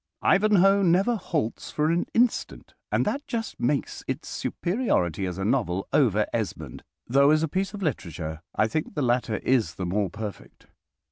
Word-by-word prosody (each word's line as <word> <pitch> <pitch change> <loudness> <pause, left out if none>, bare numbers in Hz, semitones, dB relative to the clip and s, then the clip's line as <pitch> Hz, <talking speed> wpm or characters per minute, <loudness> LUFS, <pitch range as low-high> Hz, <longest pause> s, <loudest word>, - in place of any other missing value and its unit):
"Ivanhoe" 195 -1 +4
never 195 +6 +3
halts 165 - -3
for 155 +1 +1
an 170 +1 0
instant, 240 +1 0 0.2
and - - +2
that 285 +1 -2
just 225 -3 -4
makes 140 +3 -1
its - - -4
superiority 135 - -1
as 90 0 -5
a 95 - -2
novel 100 -6 0
over - - +3
"Esmond," - - -4 0.2
though 140 +3 +4
as 155 +1 +4
a - - +2
piece 190 +6 -2
of 200 - -6
literature 85 - -3
I 110 - +3
think 155 +8 -3
the 145 - 0
latter 120 -2 +1
is 120 -10 +1
the 95 - -4
more 100 +2 0
perfect. 105 +2 -8
140 Hz, 165 wpm, -26 LUFS, -, 0.2 s, Ivanhoe